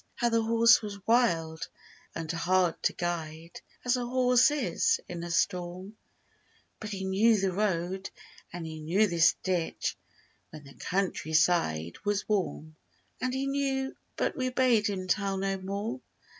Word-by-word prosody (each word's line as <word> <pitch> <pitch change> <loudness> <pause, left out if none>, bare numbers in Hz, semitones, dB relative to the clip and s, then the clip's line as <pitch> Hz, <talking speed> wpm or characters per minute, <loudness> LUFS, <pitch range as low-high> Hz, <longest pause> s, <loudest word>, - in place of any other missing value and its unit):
How 240 - +1
the 230 0 +2
horse 230 +1 +5
was 200 -2 -8
wild 165 -9 +1 0.5
and 165 -1 -3
hard 175 0 +1
to - - +1
guide, 165 -1 -5 0.2
As 250 +1 +2
a 245 - -2
horse 250 +1 +4
is, 455 +10 +1
in 175 -1 -6
a 175 - -5
storm; 180 +3 -1 0.8
But 215 - -6
he 195 -2 -5
knew 210 +3 +3
the 190 -1 +1
road 190 -1 -1 0.4
and 175 -1 -6
he 160 -1 -7
knew 175 +8 +2
this 170 -5 +4
ditch 180 -3 -1 0.5
When 155 -1 -11
the 140 -1 -14
country 180 -4 -2
side 85 - +2
was 205 -1 -1
warm. 170 -6 -2 0.4
And 255 - 0
he 265 +1 -2
knew—but 275 -1 -2
we 255 -1 -1
bade 250 -4 +3
him 190 -2 -3
tell 195 0 0
no 195 0 -1
more. 200 +7 -4
195 Hz, 150 wpm, -29 LUFS, 170-230 Hz, 0.8 s, horse